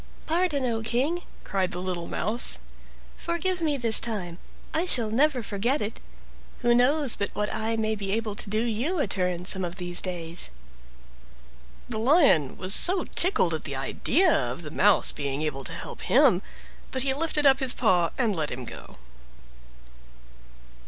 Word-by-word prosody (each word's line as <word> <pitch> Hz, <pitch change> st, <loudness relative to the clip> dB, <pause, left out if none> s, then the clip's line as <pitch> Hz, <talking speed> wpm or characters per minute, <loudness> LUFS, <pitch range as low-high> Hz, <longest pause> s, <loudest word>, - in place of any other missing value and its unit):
"Pardon, 320 Hz, -5 st, 0 dB
O 230 Hz, -2 st, -1 dB
King," 260 Hz, +10 st, 0 dB, 0.2 s
cried 190 Hz, -2 st, -1 dB
the 180 Hz, -, -4 dB
little 180 Hz, -2 st, -4 dB
Mouse; 230 Hz, +3 st, +1 dB, 0.6 s
"forgive 350 Hz, +1 st, -2 dB
me 300 Hz, -3 st, 0 dB
this 230 Hz, -3 st, +2 dB
time, 185 Hz, -7 st, -3 dB, 0.3 s
I 320 Hz, -, +2 dB
shall 235 Hz, -11 st, +3 dB
never 265 Hz, +1 st, +2 dB
forget 230 Hz, +8 st, -1 dB
it: 210 Hz, +2 st, -4 dB, 0.6 s
who 240 Hz, -, +3 dB
knows 260 Hz, +2 st, +2 dB
but 200 Hz, -, -3 dB
what 210 Hz, 0 st, -2 dB
I 225 Hz, +1 st, -1 dB
may 220 Hz, 0 st, 0 dB
be 200 Hz, -2 st, -4 dB
able 220 Hz, -1 st, -1 dB
to 205 Hz, -, -6 dB
do 215 Hz, +2 st, 0 dB
you 240 Hz, -, -2 dB
a 290 Hz, -, +1 dB
turn 180 Hz, -2 st, -2 dB
some 190 Hz, 0 st, 0 dB
of 175 Hz, 0 st, -4 dB
these 175 Hz, -1 st, -3 dB
days?" 175 Hz, -2 st, -2 dB, 1.4 s
The 220 Hz, -3 st, -4 dB
Lion 250 Hz, -, +3 dB
was 185 Hz, +1 st, 0 dB
so 365 Hz, -, +7 dB
tickled 340 Hz, -, +2 dB
at 160 Hz, -, -4 dB
the 140 Hz, -, -5 dB
idea 300 Hz, -, +1 dB
of 125 Hz, +5 st, -2 dB
the 150 Hz, -, -8 dB
Mouse 200 Hz, +4 st, +3 dB
being 140 Hz, +1 st, -4 dB
able 135 Hz, -3 st, -3 dB
to -, -, -3 dB
help -, -, -7 dB
him, -, -, +4 dB, 0.5 s
that 260 Hz, -, 0 dB
he 270 Hz, -1 st, 0 dB
lifted 300 Hz, 0 st, -1 dB
up 270 Hz, -1 st, +5 dB
his 265 Hz, -3 st, +2 dB
paw 180 Hz, -8 st, +2 dB
and 230 Hz, -6 st, 0 dB
let 155 Hz, -3 st, -2 dB
him 125 Hz, 0 st, -6 dB
go. -, -, -11 dB
220 Hz, 170 wpm, -26 LUFS, 180-275 Hz, 1.4 s, so